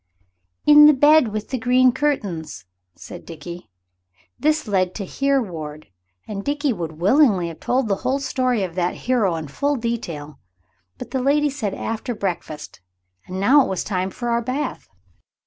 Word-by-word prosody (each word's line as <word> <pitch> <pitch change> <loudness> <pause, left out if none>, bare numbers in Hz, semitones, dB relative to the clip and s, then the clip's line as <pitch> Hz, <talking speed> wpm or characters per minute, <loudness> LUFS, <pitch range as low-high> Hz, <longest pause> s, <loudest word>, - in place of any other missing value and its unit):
"In 295 0 +9
the 300 - +6
bed 295 0 +5
with 215 0 -5
the 260 - -2
green 250 +2 +4
curtains," 190 - -3 0.3
said - - -10
Dickie. 170 +2 -9 0.7
This 310 -2 +1
led 185 -3 0
to 200 - -4
Here 275 +7 +1
Ward, 155 - -7 0.4
and 200 -2 -5
Dickie 290 0 0
would 165 -6 -5
willingly 190 - +3
have 165 - -10
told 255 -1 0
the 195 -2 0
whole 265 +6 -1
story 255 -5 0
of 180 -3 -4
that 180 0 -1
hero 225 -9 +2
in 160 -2 -5
full 285 - -1
detail, 175 - -5 0.6
but - - -9
the 265 - -1
lady 290 +2 +2
said 215 -8 -3
after 225 +2 -4
breakfast, 170 - -5 0.5
and 185 +1 -5
now 265 +9 +6
it - - -4
was 190 - -2
time 185 -2 -2
for 240 +5 -5
our 235 0 +1
bath. 255 +3 -4
225 Hz, 165 wpm, -21 LUFS, 180-270 Hz, 0.7 s, In